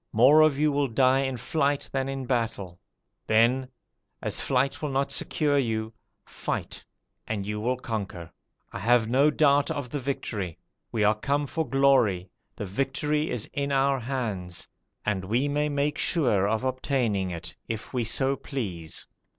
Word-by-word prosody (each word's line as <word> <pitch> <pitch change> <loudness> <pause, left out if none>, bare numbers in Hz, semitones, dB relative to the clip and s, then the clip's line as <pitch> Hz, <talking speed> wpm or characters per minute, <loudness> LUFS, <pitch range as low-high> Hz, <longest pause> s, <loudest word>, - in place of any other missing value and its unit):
More 130 +8 +7
of 155 -3 +4
you 150 +1 +3
will 140 0 +1
die 130 +2 +3
in 135 -2 -1
flight 140 +3 0
than 135 0 -1
in 135 -1 -3
the - - -9
battle. 110 -8 -2 0.5
Then, 120 +4 +3 0.5
as - - -2
flight 135 +1 0
will 150 - -2
not 140 +1 0
secure 145 0 +1
you, 110 -3 -1 0.3
fight, - - -4 0.4
and 100 -3 -2
you 105 +1 -3
will 125 +4 0
conquer. 100 -8 -5 0.4
I - - -4
have 120 +1 +3
no 135 +6 +4
doubt 145 -1 +3
of 130 -4 -4
the 145 - -2
victory: 105 - -3 0.3
we 110 - 0
are 105 +1 +5
come 140 +7 -1
for 160 -1 -3
glory, 120 -9 +3 0.2
the 105 - -5
victory 140 - -1
is 115 - -3
in 140 0 -1
our 135 0 +2
hands, 110 -9 -3 0.4
and 100 -3 0
we 120 +9 +1
may 150 +1 0
make 145 +1 0
sure 120 - +2
of 110 +3 0
obtaining 125 -7 0
it 85 -2 -6
if 110 +2 -5
we 125 -2 0
so 130 +4 +2
please.' 95 - -5
130 Hz, 165 wpm, -27 LUFS, 110-140 Hz, 0.5 s, More